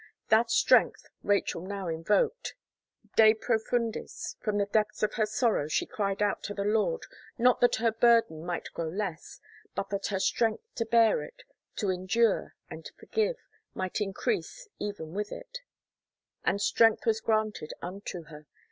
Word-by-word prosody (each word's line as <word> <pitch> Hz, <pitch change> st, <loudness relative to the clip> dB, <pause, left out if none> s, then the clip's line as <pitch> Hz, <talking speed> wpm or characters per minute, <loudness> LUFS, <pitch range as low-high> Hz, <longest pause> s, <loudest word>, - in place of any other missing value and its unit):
That 225 Hz, +2 st, +4 dB
strength -, -, +4 dB, 0.2 s
Rachel 200 Hz, -4 st, 0 dB
now 195 Hz, 0 st, -5 dB
invoked. 195 Hz, -, 0 dB, 0.6 s
De 220 Hz, 0 st, +7 dB
Profundis, 230 Hz, 0 st, -2 dB
from 210 Hz, -1 st, -1 dB
the 200 Hz, -, +2 dB
depths 215 Hz, +1 st, 0 dB
of 210 Hz, -, +1 dB
her 215 Hz, -2 st, +1 dB
sorrow 215 Hz, -, +1 dB
she 155 Hz, -, 0 dB
cried 200 Hz, -1 st, -1 dB
out 205 Hz, -, 0 dB
to 205 Hz, -, -5 dB
the 200 Hz, -, -2 dB
Lord, 220 Hz, -, +1 dB, 0.3 s
not 250 Hz, 0 st, +3 dB
that 245 Hz, -, +5 dB
her 230 Hz, 0 st, +1 dB
burden 225 Hz, -8 st, +3 dB
might 175 Hz, 0 st, -4 dB
grow 165 Hz, -, -3 dB
less, 180 Hz, -2 st, -5 dB, 0.4 s
but 195 Hz, -, -3 dB
that 200 Hz, -1 st, -2 dB
her 195 Hz, -2 st, -1 dB
strength 225 Hz, -, +1 dB
to 230 Hz, -, -3 dB
bear 230 Hz, -, +4 dB
it, -, -, -11 dB, 0.3 s
to 205 Hz, -4 st, 0 dB
endure 185 Hz, +6 st, +1 dB
and -, -, -9 dB
forgive, 445 Hz, +3 st, -1 dB, 0.4 s
might 185 Hz, +3 st, -3 dB
increase 410 Hz, -, -2 dB
eyen 170 Hz, -6 st, -5 dB
with 210 Hz, +1 st, -3 dB
it -, -, -8 dB, 0.8 s
And 200 Hz, -, +1 dB
strength 225 Hz, +2 st, +3 dB
was 225 Hz, -1 st, +1 dB
granted 215 Hz, -7 st, -1 dB
unto 180 Hz, -1 st, -6 dB
her. 150 Hz, -1 st, -13 dB
215 Hz, 155 wpm, -29 LUFS, 195-230 Hz, 0.8 s, De